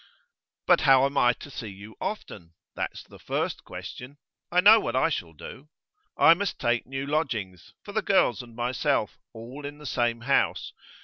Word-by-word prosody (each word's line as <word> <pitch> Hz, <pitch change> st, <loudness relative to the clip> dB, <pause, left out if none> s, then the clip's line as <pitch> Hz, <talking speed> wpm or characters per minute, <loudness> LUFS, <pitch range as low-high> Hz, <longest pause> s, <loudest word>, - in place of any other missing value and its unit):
'But -, -, +4 dB
how 135 Hz, 0 st, +6 dB
am 140 Hz, +1 st, -3 dB
I 120 Hz, -3 st, +5 dB
to 145 Hz, -, -12 dB
see 125 Hz, -3 st, -6 dB
you 105 Hz, +2 st, -11 dB
often? 85 Hz, -, -6 dB, 0.2 s
That's -, -, -4 dB
the -, -, -16 dB
first -, -, -3 dB
question. 130 Hz, +3 st, -9 dB, 0.3 s
I 180 Hz, -, +3 dB
know 210 Hz, +4 st, +8 dB
what 120 Hz, -, -3 dB
I 130 Hz, +5 st, +3 dB
shall 85 Hz, -, -4 dB
do. 130 Hz, -, -11 dB, 0.5 s
I 165 Hz, -, +7 dB
must 200 Hz, +3 st, -3 dB
take 120 Hz, 0 st, 0 dB
new 135 Hz, +1 st, -4 dB
lodgings, 115 Hz, -, -3 dB
for 205 Hz, -, -9 dB
the 220 Hz, +1 st, 0 dB
girls 190 Hz, -11 st, +2 dB
and 120 Hz, -2 st, -14 dB
myself, 120 Hz, +1 st, -1 dB
all 120 Hz, +6 st, -10 dB
in 145 Hz, +1 st, -7 dB
the 150 Hz, -, -13 dB
same 120 Hz, -3 st, -1 dB
house. 135 Hz, +3 st, 0 dB
130 Hz, 180 wpm, -26 LUFS, 115-150 Hz, 0.5 s, know